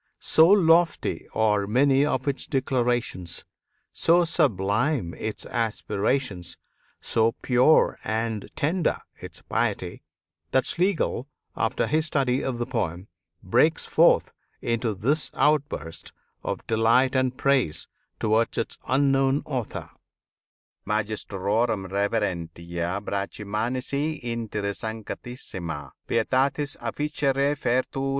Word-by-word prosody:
So 160 +1 +5
lofty 175 -4 +3
are 105 -2 +2
many 135 +5 +4
of 130 -2 -1
its 140 -1 -2
declarations, 120 - -1 0.5
so 170 +1 +4
sublime 105 - +1
its 110 0 -5
aspirations, 105 -4 -2 0.4
so 115 0 +1
pure 125 +5 +4
and 110 -1 -2
tender 165 +4 +1 0.2
its - - -10
piety, - - -2 0.5
that 130 -1 +2
Schlegel, 175 -7 0 0.3
after 115 +2 0
his 155 +1 +1
study 135 -3 +1
of 130 -2 -2
the 120 - -2
poem, 95 -7 -3 0.3
breaks 155 - +2
forth - - +4 0.3
into 115 -2 -1
this 140 +10 0
outburst 85 - 0 0.3
of - - -4
delight 115 +3 +3
and 130 -1 +1
praise 135 - +1 0.3
towards 110 +1 +1
its 115 - -3
unknown 135 +1 +2
author: 130 -6 -4 0.9
"Magistrorum 105 0 -1
reverentia 85 -3 -2
a - - -5
Brachmanis 105 +6 -3 0.3
inter 115 -3 -3
sanctissima 100 - -5 0.2
pietatis 140 +2 +1
officia 145 -2 -1
refertur. 135 -1 0
120 Hz, 100 wpm, -25 LUFS, 105-135 Hz, 0.9 s, So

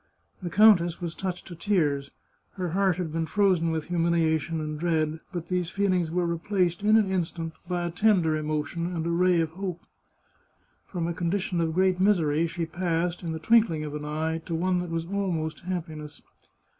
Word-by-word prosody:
The 175 - -3
countess 175 -3 +5
was 170 -2 -4
touched 185 -1 -4
to 175 - -9
tears; 155 -7 0 0.4
her 180 -2 -3
heart 190 +1 +2
had 175 -3 -3
been 165 0 -1
frozen 185 -4 +2
with 160 -1 -2
humiliation 165 -1 +1
and 155 -1 -4
dread, 160 -2 0
but 175 -3 -5
these 180 -2 -1
feelings 185 -3 +1
were 175 +2 0
replaced, 175 +1 0
in 215 +1 +5
an 220 - +4
instant, 165 -3 -2
by 175 -1 -1
a 170 - -2
tender 175 -4 +3
emotion 155 +3 -2
and 165 -1 -2
a 170 - 0
ray 180 0 +3
of 160 -1 -2
hope. 185 0 -5 1.1
From 175 -3 -3
a 170 - -1
condition 175 +1 -1
of 160 -1 -1
great 185 0 +3
misery 170 -5 +3
she 165 +1 -3
passed, 170 +1 -1
in 170 -2 -4
the 160 - -3
twinkling 190 -3 +3
of 150 -1 -5
an 150 0 -5
eye, 160 +2 -2
to 165 - -2
one 180 +2 +1
that 175 -1 -4
was 165 0 -2
almost 175 -5 -2
happiness. 160 -4 -6
170 Hz, 185 wpm, -27 LUFS, 160-185 Hz, 1.1 s, countess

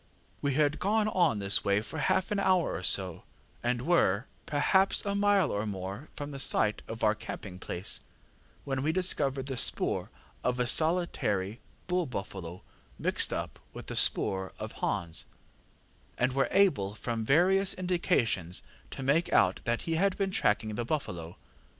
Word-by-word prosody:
We 140 -2 0
had 150 0 +2
gone 215 +2 +1
on 175 - +3
in - - -5
this 100 0 +2
way 100 0 +2
for 155 +8 -6
half 190 +5 +1
an 205 - +1
hour 185 -4 +2
or 80 - -4
so, 95 -1 +3 0.4
and 120 0 -1
were, 125 - +2 0.2
perhaps, 190 +9 +2
a 200 - -1
mile 200 -4 +3
or 105 +2 -2
more 100 +7 -6
from 145 0 -6
the 140 - -7
site 105 -5 +2
of 115 0 -6
our 105 -1 +4
camping 100 -3 -8
place, 90 0 -3 0.6
when 135 -1 -2
we 150 +3 +1
discovered 145 -7 +1
the 135 -1 -4
spoor - - +1 0.3
of 125 0 0
a 125 - +2
solitary 120 - +2 0.3
bull 180 -1 0
buffalo 95 -6 -6 0.3
mixed - - +1
up - - -4
with - - -8
the - - -6
spoor 95 -1 +1
of - - -6
Hans, 80 -2 -3 0.9
and 125 +1 +1
were 135 0 +2
able, 115 - +2
from 115 0 -3
various 185 - +4
indications, 170 - 0 0.3
to 135 - -7
make 150 +6 +2
out 90 0 +3
that 120 0 -1
he 165 -1 -1
had 195 +2 +1
been 195 -1 0
tracking 110 - +1
the 120 - -2
buffalo. 90 - -4
135 Hz, 165 wpm, -30 LUFS, -, 0.9 s, our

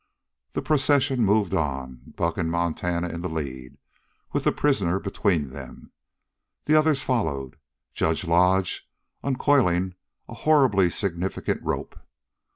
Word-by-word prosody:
The - - -2
procession 135 -3 +2
moved 105 -2 +2
on, 65 -4 -2 0.2
Buck - - -1
and 80 - 0
Montana 85 +1 -1
in 85 - -5
the 90 - -3
lead, 65 -5 -6 0.6
with - - -1
the - - +4
prisoner 100 -11 +1
between 95 -7 0
them. 65 -1 -11 0.7
The 150 - +2
others 155 -2 +4
followed, 70 - -1 0.4
Judge 80 +1 0
Lodge 90 +2 +2 0.3
uncoiling 120 -10 +2 0.3
a - - -9
horribly 115 - +3
significant 90 0 -2
rope. - - -4
90 Hz, 120 wpm, -25 LUFS, 80-125 Hz, 0.7 s, the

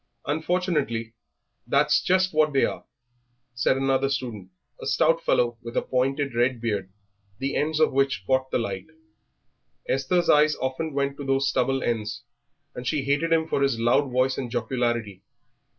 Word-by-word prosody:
"Unfortunately 150 -8 -1 0.5
that's - - +3
just 185 0 +2
what 155 -1 +3
they 135 - +4
are," - - -5 0.7
said 120 +2 +1
another 135 0 +1
student, 120 -8 -4 0.3
a - - -5
stout 165 +1 +3
fellow 120 -1 +1
with 115 0 -6
a - - +2
pointed 135 +1 0
red 120 +1 +1
beard, 100 -5 -2 0.5
the 135 +1 -3
ends 155 +1 0
of 155 -3 +3
which 135 -7 +1
caught 130 +2 +1
the - - +1
light. 100 -3 -4 1.0
Esther's 150 +7 +1
eyes 150 +1 +5
often 135 +4 -3
went 140 0 -1
to 145 - -6
those 135 0 +1
stubble 135 0 0
ends, 110 -2 -2 0.5
and 125 0 -7
she 150 -1 0
hated 145 +4 0
him 160 -1 +3
for 140 - -1
his 135 -4 +1
loud 120 +4 +2
voice 130 +1 +1
and 125 -3 -4
jocularity. 120 -4 -2
135 Hz, 160 wpm, -25 LUFS, 120-145 Hz, 1.0 s, eyes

